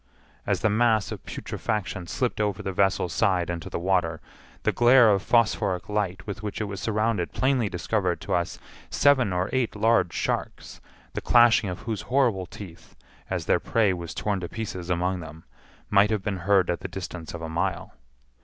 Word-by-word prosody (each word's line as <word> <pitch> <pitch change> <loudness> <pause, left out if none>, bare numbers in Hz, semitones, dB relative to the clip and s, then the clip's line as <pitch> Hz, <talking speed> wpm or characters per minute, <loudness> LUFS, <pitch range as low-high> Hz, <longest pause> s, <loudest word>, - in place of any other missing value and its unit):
As - - 0
the 110 - +3
mass 110 -1 +2
of - - -7
putrefaction 95 -4 -4
slipped 120 +3 -1
over 105 -3 -1
the 95 - -2
vessel's 95 -3 +1
side 90 -3 +1
into 85 -1 -5
the - - -3
water, 85 -3 0 0.4
the - - +2
glare 120 -1 +6
of 100 -1 +2
phosphoric 105 -6 +1
light 100 -3 -2
with 100 -2 -6
which 105 -1 -5
it - - -1
was 100 -2 -5
surrounded 110 -4 0
plainly 130 -5 +1
discovered 90 0 -1
to 100 0 -3
us 85 -1 -1 0.3
seven 135 -7 +3
or 90 +1 0
eight 130 -4 0
large 105 -5 +2
sharks, - - -3 0.3
the - - -3
clashing 120 -4 +5
of 90 - -6
whose 110 -3 -3
horrible 120 -9 +2
teeth, 90 -5 -12 0.3
as - - -2
their - - +3
prey 105 -4 +2
was 85 -2 -6
torn 100 -2 -1
to 85 - -5
pieces 95 -6 -6
among 90 +1 0
them, 80 0 -10 0.5
might 105 0 +5
have 105 -3 -1
been 100 -1 -2
heard 95 -3 +4
at 85 - -3
the - - -5
distance 90 -3 -7
of 85 - -7
a - - -3
mile. 85 +3 -2
100 Hz, 185 wpm, -26 LUFS, 90-110 Hz, 0.5 s, glare